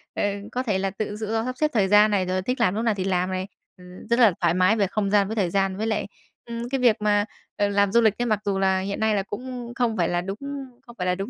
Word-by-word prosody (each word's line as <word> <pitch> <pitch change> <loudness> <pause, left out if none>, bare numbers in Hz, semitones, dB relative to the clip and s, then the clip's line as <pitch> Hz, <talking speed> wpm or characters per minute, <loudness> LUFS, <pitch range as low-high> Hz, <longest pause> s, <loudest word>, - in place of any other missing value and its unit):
ờ, - - -1 0.3
có 255 +1 -2
thể 210 -6 0
là 195 0 0
tự 205 +3 -4
tự 205 - -6 0.2
do 225 +1 0
sắp 255 0 -3
xếp 305 +1 +1
thời 200 -4 +2
gian 210 +1 +5
này, 195 -2 +1
rồi 185 +1 -1
thích 250 +7 -2
làm 205 -5 +2
lúc 220 - -1
nào 225 - +3
thì 185 - -2
làm 185 -1 0
này, 185 +1 -3 0.3
ừm, 180 0 -13
rất 235 +1 +2
là 220 -7 +6
thoải 170 -1 +3
mái 185 +4 +3
về 200 -3 +1
không 200 +1 -1
gian 200 -1 +3
với 220 - -4
thời 190 -5 +1
gian. 195 0 0
Với 220 +2 -2
lại, 215 -3 -1 0.4
ừm, 235 +1 -5
cái 270 - -1
việc 240 -4 +4
mà, 205 -1 +2 0.3
ờ, 205 - +2
làm 200 -1 +2
du 235 +2 +5
lịch 215 -2 +3
ấy, - - +1
mặc 215 -4 +1
dù 195 -1 0
là 190 -1 +2
hiện 200 +1 -4
nay 220 -1 +2
là 195 - 0
cũng 245 +3 -7
không 240 -4 0
phải 170 - +1
là 175 0 0
đúng 195 +3 -5 0.5
không 235 - -13
phải 180 - -2
là 180 - +2
đúng 195 +4 -5
205 Hz, 305 wpm, -24 LUFS, 190-225 Hz, 0.5 s, là